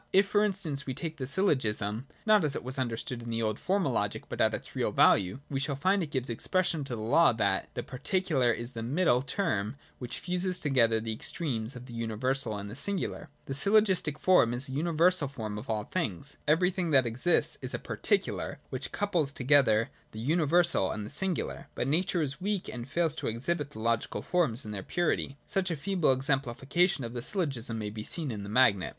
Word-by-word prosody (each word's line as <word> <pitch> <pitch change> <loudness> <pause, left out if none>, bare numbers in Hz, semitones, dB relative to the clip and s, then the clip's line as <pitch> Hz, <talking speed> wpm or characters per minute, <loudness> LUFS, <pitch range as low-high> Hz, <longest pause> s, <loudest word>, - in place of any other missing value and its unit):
If 195 +1 +5
for 205 +1 +2
instance 175 -10 -1
we 130 - -3
take 160 -2 -4
the 130 - -4
syllogism 125 - +1 0.2
(not 215 -3 +5
as 145 -3 0
it - - -4
was 130 +2 -4
understood 120 +1 -3
in 115 - -7
the 115 0 -1
old 110 -1 -1
formal 185 -6 0
logic, 105 -4 -1
but - - -3
at - - +4
its - - -7
real - - 0
value), 95 +7 +3
we 135 - -2
shall 140 +1 -1
find 185 +8 +2
it 160 - -3
gives 130 -3 -2
expression 160 +6 0
to 125 - -4
the 110 - -6
law 125 +5 +5
that 100 -3 0
the - - -3
particular 145 -2 0
is 120 +2 -5
the 115 - -5
middle 125 +1 +2
term 130 - -2 0.2
which 125 -2 -4
fuses 180 +2 -1
together 120 -8 +2
the 110 0 -3
extremes 115 -1 -3
of 125 0 -9
the 125 - -11
universal 115 +1 -1
and 100 0 -6
the - - -8
singular. 190 0 -3 0.2
The 135 - -4
syllogistic 190 -2 +3
form 150 -8 +4
is 130 +3 0
a - - -8
universal 165 +2 +2
form 110 -6 -5
of 115 - -11
all 110 -2 -1
things. 135 - -3
Everything 180 +3 +2
that 135 -4 +4
exists 120 +10 +1
is - - +1
a - - -1
particular, - - -1
which - - -3
Wouples 175 -9 0
together 130 -4 +3 0.2
the 110 - -7
universal 160 - +4
and 105 - -4
the - - -8
singular. 185 +4 -2
But 125 - -1
Nature 170 +3 +1
Is 135 +1 -3
weak 200 -1 -1
and 120 +1 -7
fails 165 -1 +1
to - - -3
exhibit 145 +6 -1
the 150 - -11
logical 115 0 -1
forms 140 -10 0
in 105 - -6
their 100 -2 -4
purity. 155 - -1
Such 195 -3 -1
a 165 - -1
feeble 180 -1 +1
exemplification 135 +5 +1
of 115 0 -5
the 120 - -4
syllogism 135 - -1
may 105 -1 -4
be 110 0 -6
seen 150 +5 -2
in 105 -2 -5
the 100 - -7
magnet. 105 -7 +3
135 Hz, 205 wpm, -29 LUFS, 115-170 Hz, 0.2 s, If